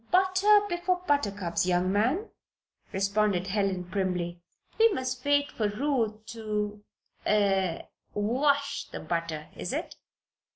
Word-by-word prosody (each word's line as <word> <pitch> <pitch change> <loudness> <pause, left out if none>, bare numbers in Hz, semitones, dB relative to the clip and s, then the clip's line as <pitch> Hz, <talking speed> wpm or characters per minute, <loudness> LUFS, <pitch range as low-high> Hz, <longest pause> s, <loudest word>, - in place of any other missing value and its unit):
"Butter 380 +3 +5
before 360 0 -1
buttercups, 205 - 0
young 180 +1 +2
man," 255 - +1 0.6
responded 195 -1 +1
Helen, 195 -2 0
primly. 180 -2 -2 0.4
"We 455 0 +6
must 255 -3 -3
wait 285 0 +2
for 215 - 0
Ruth 220 -2 -1
to 210 -2 -3 0.4
er 195 -4 +2 0.3
wash 280 +7 +1
the - - -6
butter, 160 -1 -3
is - - -4
it?" - - -4
210 Hz, 115 wpm, -28 LUFS, 190-285 Hz, 0.6 s, We